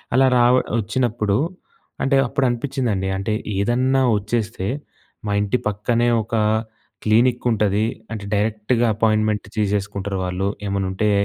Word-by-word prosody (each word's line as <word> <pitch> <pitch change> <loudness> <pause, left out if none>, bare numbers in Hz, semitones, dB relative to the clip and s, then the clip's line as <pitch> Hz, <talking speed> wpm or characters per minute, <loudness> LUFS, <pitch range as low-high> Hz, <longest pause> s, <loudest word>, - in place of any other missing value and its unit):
అలా 135 0 +5
రావ 120 0 +5 0.3
వచ్చినప్పుడు, 110 -2 0 0.7
అంటే, 135 +1 +2
అప్పుడనిపిచ్చిందండి. 120 -6 -1
అంటే, 100 +3 -2 0.2
ఏదన్నా 125 +6 +2 0.2
వచ్చేస్తే, 105 -1 -2 0.6
మా 105 - -1
ఇంటి 105 +5 +1
పక్కనే 115 +3 +1
ఒకా 110 +1 -1 0.6
క్లీనిక్కుంటది. 110 -2 +2 0.3
అంటే, 105 -2 -6
డైరెక్ట్‌గ 105 +3 0
అపాయిన్మెన్ట్ 110 -1 +1
తీసేసుకుంటారు 100 -1 -1
వాళ్ళు. 90 +2 -1 0.2
ఏమన్నుంటే 100 +1 0
110 Hz, 100 wpm, -21 LUFS, 100-120 Hz, 0.7 s, అలా